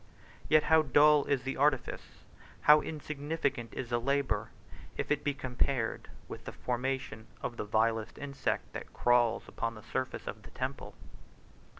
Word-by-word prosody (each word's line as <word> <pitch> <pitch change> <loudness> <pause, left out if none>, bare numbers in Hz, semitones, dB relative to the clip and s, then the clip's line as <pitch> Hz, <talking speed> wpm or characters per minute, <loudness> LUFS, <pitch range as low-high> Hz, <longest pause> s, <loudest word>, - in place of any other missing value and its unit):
Yet 155 -1 +6
how 160 +1 +5
dull 150 +1 +5
is 135 -3 0
the 135 +1 -3
artifice, 140 -2 0 0.4
how 150 0 +7
insignificant 145 -5 -3
is 125 -2 -5
the 120 0 +1
labor, 130 -5 0 0.5
if - - -3
it 150 -1 +1
be 145 -1 0
compared 130 -3 -1 0.2
with - - -9
the - - -5
formation 125 -3 -3 0.2
of 120 - -3
the 105 - -4
vilest 110 +1 +1
insect 140 -1 -3
that - - -7
crawls 120 -2 +3
upon 115 0 -3
the 110 - -11
surface 130 +3 -3
of - - -6
the - - -13
temple! - - -5
130 Hz, 155 wpm, -31 LUFS, 115-145 Hz, 0.5 s, how